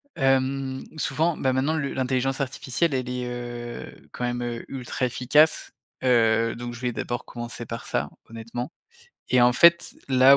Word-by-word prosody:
hem, 135 Hz, -1 st, +1 dB
souvent, 160 Hz, +2 st, +1 dB
ben, 130 Hz, -1 st, +1 dB
maintenant 135 Hz, +4 st, +1 dB
le 140 Hz, -3 st, -2 dB
l'intelligence 130 Hz, +1 st, 0 dB
artificielle, 135 Hz, +3 st, -1 dB
elle 130 Hz, -1 st, -1 dB
est, 125 Hz, 0 st, -3 dB
heu, 120 Hz, -1 st, -6 dB, 0.2 s
quand -, -, -6 dB
même, 120 Hz, 0 st, -1 dB
heu, 120 Hz, -1 st, -4 dB
ultra 130 Hz, -1 st, -3 dB
efficace, 140 Hz, +6 st, +3 dB, 0.3 s
heu, 115 Hz, -2 st, +4 dB
donc 120 Hz, 0 st, -6 dB
je 120 Hz, -, -10 dB
vais 125 Hz, -, 0 dB
d'abord 120 Hz, +1 st, -3 dB
commencer 120 Hz, 0 st, -6 dB
par 115 Hz, +1 st, -6 dB
ça, -, -, -1 dB, 0.2 s
honnêtement 115 Hz, +4 st, -5 dB, 0.6 s
et 125 Hz, -, +4 dB
en 125 Hz, 0 st, +6 dB
fait, 170 Hz, +7 st, +5 dB
là, 130 Hz, +1 st, +7 dB
125 Hz, 160 wpm, -25 LUFS, 120-135 Hz, 0.6 s, là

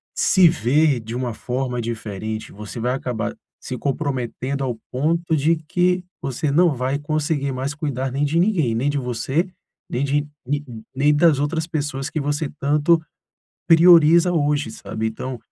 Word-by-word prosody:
se 185 Hz, -4 st, +5 dB
ver 140 Hz, +1 st, +2 dB
de 115 Hz, +2 st, -7 dB
uma 125 Hz, -2 st, -2 dB
forma 125 Hz, +1 st, -3 dB
diferente, 110 Hz, -1 st, -5 dB
você 105 Hz, +3 st, -8 dB
vai 125 Hz, +2 st, 0 dB
acabar 120 Hz, -3 st, -3 dB, 0.2 s
se 130 Hz, -, -6 dB
comprometendo 135 Hz, -1 st, -2 dB
ao 125 Hz, -3 st, -2 dB
ponto 160 Hz, +5 st, 0 dB
de 155 Hz, +3 st, +3 dB
que 180 Hz, +3 st, 0 dB, 0.2 s
você 140 Hz, +2 st, -2 dB
não 165 Hz, 0 st, +4 dB
vai 130 Hz, +3 st, -1 dB
conseguir 145 Hz, -1 st, -1 dB
mais 130 Hz, +3 st, -3 dB
cuidar 135 Hz, -4 st, -3 dB
nem 140 Hz, +3 st, 0 dB
de 155 Hz, +4 st, +1 dB
ninguém, 170 Hz, -, +2 dB
nem 130 Hz, +5 st, +1 dB
de 145 Hz, -, -2 dB
você, 130 Hz, +8 st, -1 dB, 0.4 s
nem 125 Hz, -, -1 dB
de 145 Hz, +1 st, +1 dB, 0.2 s
ni, 145 Hz, +3 st, -1 dB
n 115 Hz, -3 st, -9 dB
nem 145 Hz, +3 st, +3 dB
das 155 Hz, -2 st, +4 dB
outras 160 Hz, +2 st, -1 dB
pessoas 145 Hz, -4 st, -3 dB
que 155 Hz, -, -2 dB
você 145 Hz, +2 st, -1 dB
tanto 150 Hz, +4 st, +3 dB, 0.7 s
prioriza 170 Hz, +1 st, +7 dB
hoje, 145 Hz, -5 st, +1 dB
sabe. 110 Hz, 0 st, -5 dB
Então, 125 Hz, +3 st, -6 dB
140 Hz, 160 wpm, -21 LUFS, 125-155 Hz, 0.7 s, prioriza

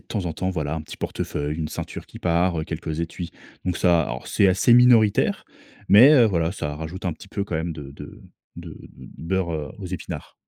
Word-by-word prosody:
temps 100 Hz, -5 st, -4 dB
en 85 Hz, -, -2 dB
temps, 95 Hz, +4 st, -2 dB
voilà, 75 Hz, -4 st, -3 dB
un 80 Hz, -, -4 dB
petit -, -, -10 dB
portefeuille, 75 Hz, +1 st, -3 dB
une 80 Hz, -2 st, -3 dB
ceinture -, -, -6 dB
qui -, -, -13 dB
part, 85 Hz, -1 st, +1 dB
quelques 80 Hz, -1 st, -5 dB
étuis. 85 Hz, +1 st, -5 dB, 0.3 s
Donc 90 Hz, -2 st, -1 dB
ça, 85 Hz, -2 st, +3 dB
alors -, -, -5 dB
c'est 100 Hz, -, +3 dB
assez 110 Hz, +6 st, +4 dB
minoritaire 120 Hz, -4 st, +4 dB, 0.4 s
mais, 120 Hz, +9 st, +8 dB
heu, 125 Hz, -6 st, +7 dB
voilà 85 Hz, -5 st, 0 dB
ça 75 Hz, -6 st, -4 dB
rajoute 80 Hz, +5 st, -7 dB
un 90 Hz, -, 0 dB
petit 90 Hz, -, -14 dB
peu 100 Hz, 0 st, -3 dB
quand 90 Hz, -, -5 dB
même 80 Hz, +2 st, -2 dB
de 70 Hz, -3 st, -9 dB
de 70 Hz, -, -11 dB, 0.4 s
de 85 Hz, -2 st, -9 dB, 0.4 s
beurre 85 Hz, -4 st, -3 dB
aux 95 Hz, -, -6 dB
épinards. 90 Hz, -1 st, -7 dB
85 Hz, 200 wpm, -23 LUFS, 80-95 Hz, 0.4 s, mais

